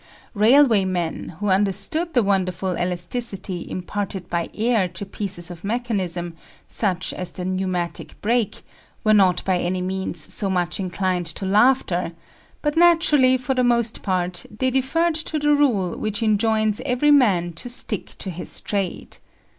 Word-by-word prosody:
Railway 225 0 +5
men, 175 -3 -3
who 205 - -1
understood 205 - 0
the 245 - +4
wonderful 185 -2 0
elasticity 180 +1 -3
imparted 190 0 -4
by 170 -1 -1
air 220 -3 +2
to 180 +3 -6
pieces 190 -3 -3
of 170 -1 -10
mechanism, 195 -7 -2 0.3
such 185 -4 -1
as 180 - -5
the 180 - -6
pneumatic 185 -2 -3
brake, 230 -1 0 0.4
were 215 -2 +4
not 185 -4 +3
by 185 -2 +1
any 180 +1 -1
means 190 -1 -3
so 195 +6 -1
much 175 -1 -1
inclined 185 -1 -1
to 180 +4 -5
laughter; 195 -4 +2 0.5
but 295 0 0
naturally, 325 -6 +5
for 255 +1 -2
the 255 -1 +1
most 235 -2 +1
part, 180 -2 -1
they 260 +5 -1
deferred 295 +6 +1
to 315 0 -1
the 295 0 +3
rule 230 -12 +2
which 215 +1 -2
enjoins 215 0 +2
every 275 +2 +2
man 195 -12 +4
to 170 +9 -6
stick 230 -4 0
to 190 - -5
his 175 +1 -6
trade. 195 -3 -3
200 Hz, 150 wpm, -22 LUFS, 180-245 Hz, 0.5 s, Railway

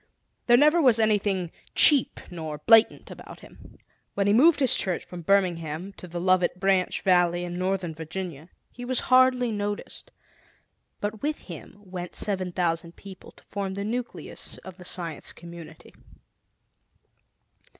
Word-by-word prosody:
There 240 0 +6
never 300 +5 +4
was 250 -6 +4
anything 200 -5 0 0.2
cheap 290 -4 +5
nor 160 -3 -6
blatant 225 +9 +4
about - - -12
him. - - -16 0.4
When 200 - 0
he 205 - +3
moved 295 +8 +5
his 265 -4 +5
church 185 -4 -1
from 180 -1 -9
Birmingham 175 -1 -1
to 180 - -10
the 175 0 -6
Lovett 180 0 +1
Branch 190 -1 +1
Valley 175 -1 +2
in 175 0 -6
northern 185 -2 -2
Virginia, 160 0 -7 0.2
he 245 - -10
was 250 0 -1
hardly 255 -2 +3
noticed. 205 -1 -5 0.9
But 210 +1 -4
with 300 +1 -2
him 170 -1 -11
went 180 -1 -7
seven 190 -3 -2
thousand 170 -1 -2
people, 195 -2 -13
to - - -20
form 195 -1 -5
the 200 - -4
nucleus 240 +3 -6
of 190 -1 -10
the 180 - -12
Science 170 -4 -4
Community. 170 -1 -13
190 Hz, 145 wpm, -25 LUFS, 175-220 Hz, 0.9 s, There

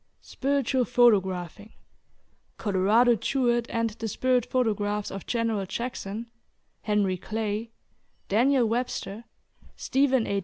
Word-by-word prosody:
SPIRITUAL 270 -2 0
PHOTOGRAPHING. 205 -5 +1 0.8
COLORADO 215 +4 +3
JEWETT 240 +1 0
AND 230 -1 -1
THE 225 +1 -5
SPIRIT 250 +2 +1
PHOTOGRAPHS 210 -4 0
OF 195 -1 -7
GENERAL 225 -5 -1
JACKSON, 230 -1 -4 0.6
HENRY 205 -3 +1
CLAY, 215 +2 -3 0.6
DANIEL 245 +4 +3
WEBSTER, 230 -2 -3 0.5
STEPHEN 265 -3 +1
A. 200 - -1
225 Hz, 100 wpm, -26 LUFS, 205-245 Hz, 0.8 s, COLORADO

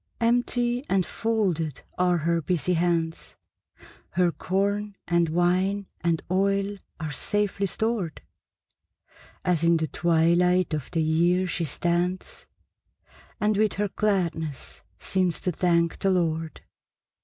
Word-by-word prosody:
Empty 240 +1 +1
and 190 -2 +2
folded 185 - -1
are 180 -1 +2
her 170 +1 0
busy 180 +2 0
hands; 165 -1 -1 0.8
Her 175 0 +3
corn 200 +3 -1
and 170 -1 +2
wine 185 +4 +1 0.2
and 170 -2 +1
oil 195 +1 +1 0.2
are 155 -2 -4
safely 200 +4 0
stored, 215 -5 -2 1.2
As 175 -3 +1
in 170 0 +4
the 160 0 -1
twilight 175 +2 +2
of 150 -4 -3
the 165 -2 0
year 170 +4 +2
she 175 -2 -2
stands, 175 +4 -2 0.9
And 210 0 +2
with 215 0 +2
her 205 0 -1
gladness 170 -8 -2 0.2
seems 185 -4 0
to 180 - 0
thank 170 -1 +1
the 195 - +1
Lord. 165 -3 -1
180 Hz, 120 wpm, -26 LUFS, 165-200 Hz, 1.2 s, in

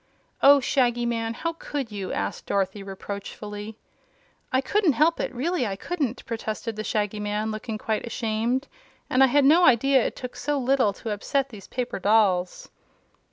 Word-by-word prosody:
"Oh, 285 +1 +8
Shaggy 245 -2 +1
Man! 230 -1 -1
How 335 +6 -2
could 285 -7 -5
you?" 195 -3 -5
asked 100 0 -3
Dorothy, 200 +1 -1
reproachfully. 205 +2 -7 0.7
"I 260 - +3
couldn't 365 +3 +2
help 315 +6 +3
it - - -2
really 270 +2 -1
I 195 - -3
couldn't," 275 - -3
protested 225 0 -4
the 215 - -4
Shaggy 210 -1 -1
Man, 210 +1 -2
looking 215 +1 -4
quite 220 +2 -2
ashamed. 235 +4 -1 0.4
"And 260 +1 +5
I - - +7
had 280 +2 +3
no 325 +6 +6
idea 260 -1 +5
it - - -2
took 250 -1 -7
so 295 -1 -1
little 260 -4 +2
to 220 +2 -6
upset 270 +6 -1
these 205 -5 -11
paper 245 -4 -3
dolls." 190 -3 +2
230 Hz, 165 wpm, -25 LUFS, 210-270 Hz, 0.7 s, Oh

